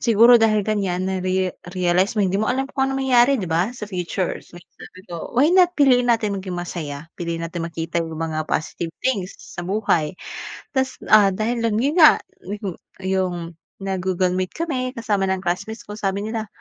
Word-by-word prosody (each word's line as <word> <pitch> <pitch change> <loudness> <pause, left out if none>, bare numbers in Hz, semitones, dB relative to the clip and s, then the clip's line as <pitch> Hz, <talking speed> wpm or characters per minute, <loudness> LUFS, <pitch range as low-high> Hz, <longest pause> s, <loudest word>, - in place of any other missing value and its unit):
siguro 235 +1 +7
dahil 215 -2 +3
ganiyan 190 -4 -1
nare-realized 185 +1 0
mo, 205 - +3
hindi 190 +1 +1
mo 220 - 0
alam 265 +2 +1
kung 265 -1 0
anong 270 0 -2
mangyari 255 +1 +5
'di 180 - -4
ba 175 +8 +1
sa 210 - -5
future. 180 -1 -2
Kaya 175 0 -15 0.2
sabi 185 - -12
ko, 170 +6 -7
why 285 +5 +5
not 360 -1 +5
piliin 250 -4 +4
natin 225 -3 +2
maging 185 -2 -5
masaya? 160 -4 -5 0.2
Piliin 170 -1 -3
natin 165 0 -4
makita 165 +1 -3
'yung 160 -1 -5
mga 155 -1 -3
positive 165 +1 -2
things 200 -8 -1
sa 175 - -9
buhay. 185 -5 0 0.6
Tapos, 265 -1 0 0.2
ah, 205 -2 +7
dahil 230 +3 -1
dun 220 -1 +1
'yon 290 +3 +1
nga 310 - +9 0.3
'yung 200 -2 -4 0.3
'yung 190 -1 0 0.5
nag-Google 185 -1 0
meet 185 -1 -3
kami 260 -6 -2
kasama 205 -4 0
ng 190 0 -1
classmates 195 +5 -3
ko 210 +1 -9
sabi 195 +1 -1
nila, 220 0 -3
195 Hz, 180 wpm, -22 LUFS, 175-230 Hz, 0.6 s, nga